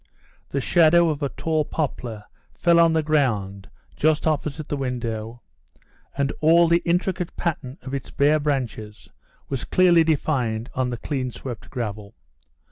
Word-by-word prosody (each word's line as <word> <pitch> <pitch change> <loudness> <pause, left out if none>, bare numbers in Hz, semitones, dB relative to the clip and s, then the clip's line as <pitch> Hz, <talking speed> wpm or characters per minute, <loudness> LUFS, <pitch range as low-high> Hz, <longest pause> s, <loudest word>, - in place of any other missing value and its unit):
The 140 - -1
shadow 170 +3 +4
of 150 -1 -3
a 140 - 0
tall 155 +1 -1
poplar 125 -8 -4 0.3
fell 170 -1 +4
on 165 -1 +5
the 160 -1 +1
ground 110 -10 0 0.3
just 155 0 +1
opposite 155 -1 -1
the - - -2
window, 120 -3 -4 0.8
and 140 0 0
all 165 +2 +5
the 170 +1 +3
intricate 180 +1 -1
pattern 150 -6 -3
of 130 - -7
its 140 - -4
bare 150 +2 +3
branches 125 -8 -3 0.4
was 135 -3 -3
clearly 175 -2 +4
defined 130 -8 -1
on 130 -1 -1
the 120 - -4
clean 130 0 -3
swept 120 -2 -8
gravel. 105 -5 -5
140 Hz, 145 wpm, -23 LUFS, 120-160 Hz, 0.8 s, on